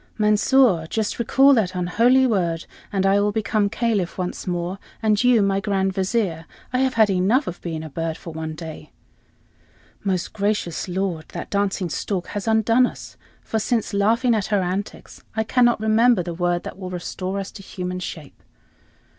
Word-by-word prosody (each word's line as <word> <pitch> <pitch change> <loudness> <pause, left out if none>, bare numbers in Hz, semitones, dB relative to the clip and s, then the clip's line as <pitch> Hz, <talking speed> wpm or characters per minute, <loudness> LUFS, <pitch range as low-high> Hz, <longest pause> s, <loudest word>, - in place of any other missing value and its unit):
"Mansor, 210 -4 +3
just 220 0 -2
recall 270 +4 +5
that 195 -7 +1
unholy 230 +9 +3
word, 175 -8 0 0.3
and 195 -2 0
I 195 +1 +4
will 205 0 +2
become 210 -1 0
Caliph 215 -6 -1
once 180 0 -4
more, 175 +2 -2 0.2
and 215 0 +2
you 245 -4 +5
my 195 0 +1
Grand 195 -2 0
Vizier. 190 -4 -1 0.3
I 255 - +2
have 260 -1 +1
had 220 -3 +4
enough 200 +10 +2
of 175 - -6
being 160 -2 -4
a 160 - -7
bird 165 +2 -3
for 165 - -9
one 160 0 -5
day." 160 -1 -9 1.1
"Most 185 -3 -1
gracious 205 -5 -1
lord, 180 -3 -2
that - - -6
dancing 200 -3 0
stork 185 +1 -2
has 205 +1 -5
undone 225 +3 +4
us, - - -10 0.3
for, 220 - -1
since 225 0 -1
laughing 230 +5 +2
at 210 -3 0
her 205 -3 +1
antics, 190 +3 -5
I 220 - +1
cannot 240 +1 +3
remember 220 -1 +3
the 170 0 -5
word 175 0 0
that - - -8
will 185 -2 -5
restore 185 +2 -4
us 195 - -5
to 205 - -11
human 180 -1 -5
shape." 155 -5 -8
200 Hz, 175 wpm, -22 LUFS, 180-220 Hz, 1.1 s, recall